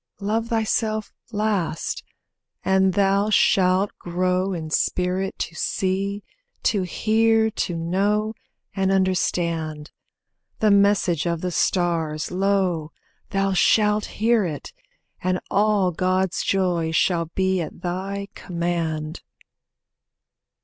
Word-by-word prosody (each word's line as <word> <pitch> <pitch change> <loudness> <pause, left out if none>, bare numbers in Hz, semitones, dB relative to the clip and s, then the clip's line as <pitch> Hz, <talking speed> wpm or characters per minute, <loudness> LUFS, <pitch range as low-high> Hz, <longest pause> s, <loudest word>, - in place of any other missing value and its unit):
Love 220 +3 -1
thyself 220 -1 -1 0.2
last, 205 -6 -1 0.6
and 190 -1 +3
thou 200 +1 +3
shalt 190 -1 +3
grow 185 +2 0
in 160 -4 -5
spirit 185 +3 0
To - - -4
see, 195 +4 -1 0.4
to 205 -3 +2
hear, 220 +4 +2
to 180 -4 -2
know, 200 +6 0 0.4
and 195 -1 +1
understand. 170 -5 0 0.7
The 215 -1 +3
message 200 -5 +3
of 170 -1 -1
the 180 - -2
stars, 165 -4 0
lo, 185 -4 0 0.4
thou 195 0 0
shalt 210 +2 +3
hear 225 0 +3
it, 155 -6 -5 0.5
And 185 0 +1
all 205 -2 +3
God's 185 +1 0
joys 175 -4 0
shall 170 -1 +2
be 190 -1 +1
at 165 - -7
thy 195 +3 -3
command. 170 -3 -3
190 Hz, 105 wpm, -23 LUFS, 175-200 Hz, 0.7 s, and